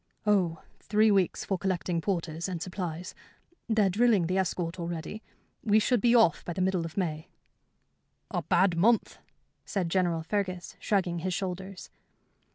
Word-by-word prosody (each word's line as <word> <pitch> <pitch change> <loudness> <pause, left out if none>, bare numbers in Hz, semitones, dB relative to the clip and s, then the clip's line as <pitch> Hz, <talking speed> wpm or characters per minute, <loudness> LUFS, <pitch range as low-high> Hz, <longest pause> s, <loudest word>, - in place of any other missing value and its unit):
"Oh, 185 -6 +1 0.2
three 215 +1 +3
weeks 195 -3 +1
for 190 -2 -1
collecting 180 -2 -1
porters 170 -2 -2
and 180 -2 -3
supplies. 180 -1 -5 0.6
They're 220 -3 +3
drilling 215 -3 +3
the 185 +3 0
escort 175 -1 -2
already. 170 +5 -5 0.4
We 210 -1 +4
should 230 +1 +2
be 240 +2 +4
off 225 -9 +4
by 175 - -4
the 185 - -3
middle 185 -2 +1
of 165 - -8
May." 160 -5 -2 1.0
"A - - -1
bad 180 0 +2
month," 220 +7 +2 0.4
said 185 -4 -2
General 170 -2 +1
Fergus, 185 0 -3
shrugging 185 -4 0
his 185 +1 -2
shoulders. 190 0 -5
185 Hz, 150 wpm, -29 LUFS, 170-200 Hz, 1.0 s, We